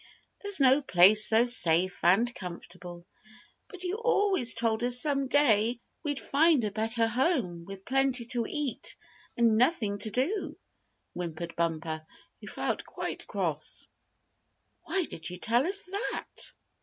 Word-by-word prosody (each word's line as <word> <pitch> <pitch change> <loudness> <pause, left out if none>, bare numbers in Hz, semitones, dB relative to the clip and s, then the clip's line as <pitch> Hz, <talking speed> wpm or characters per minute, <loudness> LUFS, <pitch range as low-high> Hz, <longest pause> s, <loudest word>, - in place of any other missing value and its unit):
"There's 405 -3 +4
no 270 +1 +4
place 205 -2 +6
so 225 +2 +4
safe 180 -6 +2
and 210 +8 +2
comfortable." 175 -2 -10 0.6
"But 370 -2 -7
you 370 +3 -3
always 405 - +2
told 230 -1 -1
us 245 0 +5
some 275 -1 0
day 240 -4 +2 0.2
we'd 290 -3 -4
find 300 -2 +2
a 210 - -2
better 225 +2 +1
home, 225 - -1
with 195 0 -10
plenty 265 -2 0
to 240 -3 -2
eat, 295 - -3 0.4
and 230 -2 +2
nothing 225 -6 0
to 215 - -2
do," 315 - -3 0.6
whimpered 170 -1 -6
Bumper, 160 -1 -3 0.4
who - - -13
felt - - -3
quite - - -7
cross. - - -3 1.0
"Why 380 - 0
did 165 - -5
you 180 - -8
tell 235 - 0
us 395 +2 +5
that?" 395 +3 -3
235 Hz, 140 wpm, -28 LUFS, 190-290 Hz, 1.0 s, place